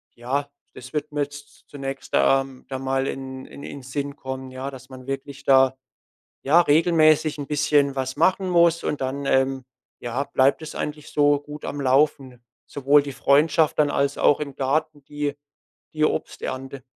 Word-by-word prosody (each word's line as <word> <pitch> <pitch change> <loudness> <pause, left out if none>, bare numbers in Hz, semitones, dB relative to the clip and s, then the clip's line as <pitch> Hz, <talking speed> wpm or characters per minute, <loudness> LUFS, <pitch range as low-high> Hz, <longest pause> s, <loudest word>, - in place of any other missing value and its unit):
ja, 135 +4 -2 0.2
das 125 0 -12
wird 150 -1 -3
mir 145 -1 -1
zu 145 0 -14
zunächst, 135 -1 -7
ähm, 135 -1 +2
da 130 -1 -4
mal 135 0 -1
in 130 -1 -6
in 140 - -12
in 140 - -8
Sinn 140 +2 -4
kommen, 130 -1 -7
ja, 130 +2 -5
dass 130 -1 -12
man 130 -1 -12
wirklich 135 +1 -6
da, 130 -1 +4 0.7
ja, 160 +6 +5
regelmäßig 155 -1 +3
'n 140 - -5
bisschen 145 -1 +2
was 130 -1 -3
machen 190 0 +2
muss 170 -1 +3
und 150 - -2
dann, 135 +2 -3
ähm, 135 0 +1 0.4
ja, 120 +3 -2
bleibt 135 +3 +2
es 155 - -8
eigentlich 150 0 -5
so 145 -1 +3
gut 150 +1 -10
am 145 - -4
Laufen. 135 -2 +1 0.2
Sowohl 145 +1 +3
die 140 - -6
Freundschaft 150 +5 +3
dann 150 -1 +4
als 140 0 0
auch 145 - +4
im 140 -3 -5
Garten 145 +2 -1
die 145 -1 -3 0.6
die 155 0 +1
Obsternte. 135 -2 -3
140 Hz, 170 wpm, -23 LUFS, 135-150 Hz, 0.7 s, ja